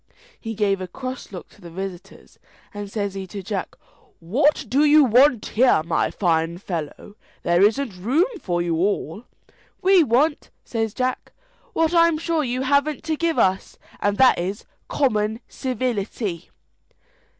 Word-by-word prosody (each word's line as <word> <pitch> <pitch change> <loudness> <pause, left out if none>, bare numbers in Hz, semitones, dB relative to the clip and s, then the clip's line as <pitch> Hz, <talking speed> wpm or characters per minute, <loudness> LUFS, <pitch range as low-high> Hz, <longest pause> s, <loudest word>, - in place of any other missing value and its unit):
He 225 -1 -6
gave 200 -2 0
a 185 - -4
cross 255 +5 -7
look 180 -3 -8
to 205 - -21
the 175 - -10
visitors, 190 +2 -9 0.3
and 205 -1 -6
says 200 -2 -2
he 195 -1 -6
to 200 +1 -7
Jack, 195 0 -4 0.4
"What 275 - +1
do 270 +6 +2
you 300 0 +6
want 250 0 +4
here, 245 -8 +3
my 165 - 0
fine 165 -2 0
fellow? 175 +1 -6 0.3
there 175 +1 +2
isn't 215 0 +2
room 270 - +2 0.2
for 175 -2 -1
you 170 -2 -1
all." 200 +2 -1 0.5
"We 375 -2 +5
want," 290 +5 +1 0.2
says 225 -2 -3
Jack, 255 0 -2 0.4
"what 325 -3 +1
I'm 335 -2 +4
sure 325 -1 -1
you 255 0 -2
haven't 285 +2 +1
to 315 0 -1
give 330 +1 -1
us 190 0 +1 0.2
and 205 0 0
that 260 -7 +5
is, 190 +5 -4 0.2
common 220 -5 0
civility." 220 -7 -3
220 Hz, 150 wpm, -22 LUFS, 190-275 Hz, 0.5 s, you